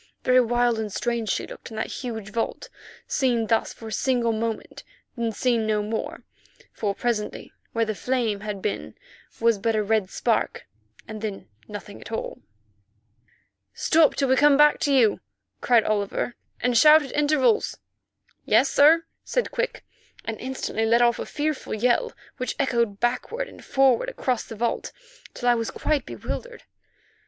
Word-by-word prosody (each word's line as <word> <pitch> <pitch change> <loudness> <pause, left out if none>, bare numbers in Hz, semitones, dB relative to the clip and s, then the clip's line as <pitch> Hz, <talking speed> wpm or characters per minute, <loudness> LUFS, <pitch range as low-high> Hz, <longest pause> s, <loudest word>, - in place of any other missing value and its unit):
Very 255 0 +5
wild 240 -1 +1
and 215 -2 -3
strange 235 0 -2
she - - -1
looked - - -10
in 220 - -9
that - - -1 0.2
huge 220 -5 -5
vault, 235 - -3 0.4
seen 245 -5 +1
thus 225 0 +1
for 225 - -9
a - - -9
single 240 -1 +1
moment, 225 0 -4 0.3
then 235 -2 -1
seen 230 -1 0
no 210 -1 +1
more, 220 +1 -4 0.5
for 200 -2 -2
presently 230 -3 -3 0.2
where 230 0 +1
the 215 - -2
flame 230 -2 -1
had 205 -2 -6
been 210 - -3 0.4
was 230 -2 +3
but 225 +2 0
a 215 - +1
red 210 -2 +1
spark, - - -1 0.4
and 215 -1 -7
then 210 -3 -5 0.2
nothing 205 -1 -9
at - - -10
all. 225 - -4 1.4
"Stop 320 -2 +4
still - - -21
till 275 -2 +1
we 260 - +5
come 290 0 +6
back 295 0 +5
to 285 - +1
you," 240 -6 +4 0.4
cried 235 -3 +4
Oliver, 210 +3 -1 0.3
"and 245 -1 +1
shout 305 +5 +7
at 270 - -8
intervals." 295 - +2 0.7
"Yes, 240 +6 +3
sir," 320 +3 +5 0.2
said - - -1
Quick, - - -2 0.4
and 225 -1 -4
instantly 260 -3 -3
let 235 +2 +4
off 235 -1 +3
a - - -4
fearful 300 -5 -2
yell, 250 - +1 0.3
which 255 - -3
echoed 235 -7 0
backward 255 - -1
and - - -14
forward 265 -3 +3
across 250 -3 -2
the 225 - -8
vault 235 +2 -2 0.4
till 245 - -3
I 245 - +6
was 230 -1 -1
quite 300 -2 -1
bewildered. - - -6
235 Hz, 165 wpm, -25 LUFS, 220-265 Hz, 1.4 s, shout